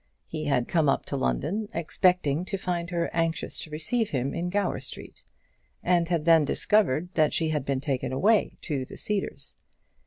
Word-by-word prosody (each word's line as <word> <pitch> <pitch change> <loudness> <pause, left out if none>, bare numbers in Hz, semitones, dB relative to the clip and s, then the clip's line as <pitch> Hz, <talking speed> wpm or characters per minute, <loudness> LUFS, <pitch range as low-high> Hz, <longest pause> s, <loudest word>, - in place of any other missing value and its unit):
He 155 -1 -3
had 125 -4 +1
come 160 -4 +2
up 135 - +1
to - - -3
London, 165 - -1
expecting 170 -2 +2
to 195 +1 -3
find 175 -2 -2
her 170 -2 -1
anxious 165 -1 -1
to - - -7
receive 180 +9 0
him 135 0 -1
in 175 +1 -2
Gower 200 +2 0
Street, - - -7 0.6
and 175 -1 +2
had 165 -3 0
then 165 -2 +6
discovered 175 0 +2
that 155 -2 +3
she 160 -2 +1
had 150 -4 -1
been 135 -2 -1
taken 135 -3 -2
away 205 +11 +2
to 140 -5 -2
the - - -10
Cedars. 195 -9 -2
165 Hz, 180 wpm, -27 LUFS, 140-180 Hz, 0.6 s, then